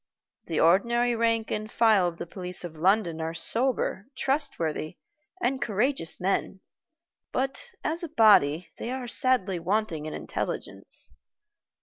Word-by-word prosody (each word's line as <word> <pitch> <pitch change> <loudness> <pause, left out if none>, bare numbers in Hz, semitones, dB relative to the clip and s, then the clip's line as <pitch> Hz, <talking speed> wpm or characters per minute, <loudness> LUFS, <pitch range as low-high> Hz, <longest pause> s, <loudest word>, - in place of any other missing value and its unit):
The 160 - -1
ordinary 235 +8 +3
rank 230 -1 +1
and 215 +1 -3
file 215 -6 +4
of 170 -1 -5
the 170 - -5
police 180 +1 -5
of 170 -2 -7
London 170 -1 +2
are 160 +1 -3
sober, 235 -2 0
trustworthy, 175 - -1 0.4
and 265 -4 0
courageous 220 - 0
men, 190 0 -1 0.7
but 270 +1 -2
as 325 +2 -2
a 340 - -5
body 185 - +4
they - - -4
are 255 -1 -4
sadly 240 -8 +2
wanting 170 -4 -1
in 155 - -5
intelligence. - - -5
210 Hz, 130 wpm, -27 LUFS, 170-245 Hz, 0.7 s, file